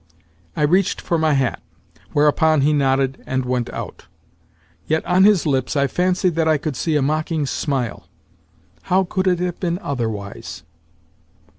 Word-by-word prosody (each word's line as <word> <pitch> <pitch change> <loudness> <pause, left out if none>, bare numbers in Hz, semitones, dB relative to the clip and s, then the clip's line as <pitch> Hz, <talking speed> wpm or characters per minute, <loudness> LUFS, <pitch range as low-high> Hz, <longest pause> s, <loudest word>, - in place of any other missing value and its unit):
I - - 0
reached 180 +5 +2
for 170 - -1
my 155 -1 +2
hat; 135 -3 0 0.5
whereupon 150 +1 +3
he 150 +2 +3
nodded, 135 -2 +1
and 130 -1 -1
went 125 -1 -1
out. - - -8 0.8
Yet 160 +1 0
on 185 +2 +4
his 205 -5 +4
lips 135 -2 0
I 140 -1 +3
fancied 180 +3 +1
that 160 0 0
I 155 -1 +3
could 150 -1 -4
see 155 +5 -1
a 145 - +2
mocking 155 +1 -1
smile. 135 -4 -3 0.8
How 190 +1 +4
could 185 +1 -2
it 180 -1 +3
have 180 0 -3
been 175 -2 -1
otherwise? 110 - -5
150 Hz, 155 wpm, -20 LUFS, 135-175 Hz, 0.8 s, on